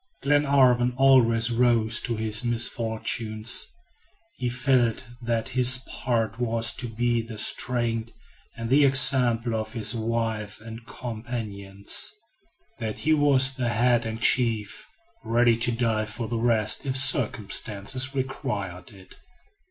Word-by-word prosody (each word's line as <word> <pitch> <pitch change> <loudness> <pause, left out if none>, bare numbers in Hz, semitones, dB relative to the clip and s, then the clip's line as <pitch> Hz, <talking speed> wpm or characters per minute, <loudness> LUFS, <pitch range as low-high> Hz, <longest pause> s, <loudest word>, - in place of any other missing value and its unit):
Glenarvan 135 -4 +2
always 120 -4 +3
rose 115 -2 +2
to 120 - -4
his 110 +1 0
misfortunes. 115 -1 0 0.7
He 125 - -3
felt 125 -2 0 0.2
that 115 0 -2
his 125 0 +2
part 115 -2 -3
was 115 -1 -1
to 125 - -2
be 120 +1 -1
the 115 -1 -10
strength 115 0 -1 0.5
and 115 0 -6
the 145 +2 +5
example 125 -4 +4
of 110 0 -4
his 110 -3 0
wife 115 -2 -3
and 115 +1 -11
companions; 110 -5 -4 0.7
that 110 -2 -5
he 155 - +1
was 140 -3 +3
the 125 -2 -3
head 120 +1 +1
and 110 0 -6
chief; 115 -3 +1 0.4
ready 120 0 +2
to 115 +1 0
die 115 -2 -1
for 115 +1 -6
the 115 0 -3
rest 110 -2 +1
if 135 -2 -2
circumstances 120 0 +1
required 115 -9 -5
it. 95 -3 -17
115 Hz, 125 wpm, -24 LUFS, 110-125 Hz, 0.7 s, the